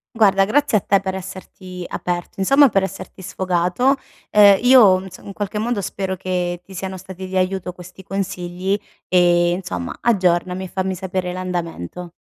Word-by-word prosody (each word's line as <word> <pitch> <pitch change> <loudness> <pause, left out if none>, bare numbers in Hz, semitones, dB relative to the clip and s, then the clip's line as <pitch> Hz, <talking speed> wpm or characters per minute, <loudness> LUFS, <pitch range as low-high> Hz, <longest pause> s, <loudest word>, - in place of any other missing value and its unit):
Guarda, 195 -3 +4
grazie 280 +2 +2
a - - -16
te 200 +1 +2
per 190 -1 -4
esserti 185 -1 -8
aperto 175 +1 -4
insomma 275 +8 +5
per 195 -3 +2
esserti 190 0 -6
sfogato. 185 +8 +1 0.4
Ehm, 205 -2 +7
io 240 -7 +7
ins 190 -1 -10
in 200 - -10
qualche 205 +1 -3
modo 230 0 -1
spero 190 0 -3
che 180 -1 -2
ti 195 - -14
siano 190 0 -5
stati 190 0 -9
di 190 0 -3
aiuto 185 0 -1
questi 180 +1 -13
consigli 190 0 -3 0.3
e, 175 -1 +4
insomma, 95 - -4
aggiornami, 185 -3 +1
fammi 190 +1 -2
sapere 185 -1 -3
l'andamento. 175 - -5
190 Hz, 155 wpm, -20 LUFS, 180-195 Hz, 0.4 s, Ehm